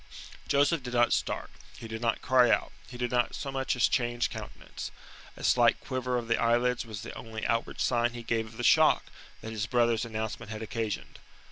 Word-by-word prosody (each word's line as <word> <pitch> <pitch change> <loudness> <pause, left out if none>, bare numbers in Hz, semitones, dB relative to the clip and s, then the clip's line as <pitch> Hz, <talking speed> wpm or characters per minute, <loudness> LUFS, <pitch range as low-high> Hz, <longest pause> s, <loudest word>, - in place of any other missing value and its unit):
Joseph 145 +3 +3
did 125 -1 -5
not 120 0 +4
start; - - -2 0.3
he 115 - -8
did 110 0 -6
not 115 -1 0
cry 125 -1 +5
out; - - +2 0.2
he 125 - -9
did 125 -1 -2
not 120 -1 +1
so 135 - -4
much 135 -1 -1
as 125 - +4
change 120 -1 0
countenance. - - -7 0.5
A - - -9
slight - - +4
quiver 125 -1 -2
of 120 -1 -4
the 115 - +1
eyelids 120 +1 +2
was 110 -1 -7
the 120 - -7
only 110 -1 -6
outward 115 0 -1
sign 120 -1 +2
he 120 -1 -7
gave 115 -1 -1
of 110 +1 -13
the 120 - -4
shock - - +4 0.3
that 110 - -6
his 110 -1 -2
brother's 120 -2 +2
announcement 110 -2 -4
had 110 0 -5
occasioned. 110 -1 -4
120 Hz, 205 wpm, -29 LUFS, 110-125 Hz, 0.5 s, cry